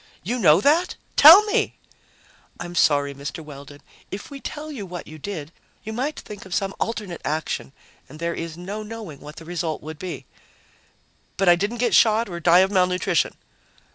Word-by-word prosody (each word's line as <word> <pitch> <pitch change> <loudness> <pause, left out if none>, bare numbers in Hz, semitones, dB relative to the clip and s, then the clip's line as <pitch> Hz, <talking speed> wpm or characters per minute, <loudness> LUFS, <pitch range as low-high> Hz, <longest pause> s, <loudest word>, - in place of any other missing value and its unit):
"You 245 +7 -2
know 165 -3 +5
that? 320 +8 +2 0.2
Tell 330 +8 +10
me!" 425 - 0 0.8
"I'm 175 0 -6
sorry, 145 -4 +2
Mr. 145 +3 -7
Weldon. 145 0 -12 0.3
If 205 +8 -8
we 275 -1 -8
tell 310 +1 -6
you 250 -8 -6
what 180 -2 -7
you 155 0 -11
did, 155 -2 -6 0.3
you 220 +1 -6
might 270 +7 -3
think 210 -1 -10
of 190 -1 -5
some 195 -1 -1
alternate 210 -6 -4
action, 155 -2 -3 0.4
and 150 - -11
there 170 +1 -2
is 165 -1 -6
no 195 +5 -6
knowing 215 -9 -8
what 150 +2 -11
the 165 - -11
result 170 -2 -3
would 155 0 -8
be." 185 -1 -6 1.1
"But 195 -2 +3
I 175 - +7
didn't 205 +7 -2
get 240 0 0
shot 225 -1 +4
or 170 -1 -5
die 175 +2 +5
of 190 +1 +2
malnutrition?" 180 -1 +1
180 Hz, 180 wpm, -23 LUFS, 160-220 Hz, 1.1 s, Tell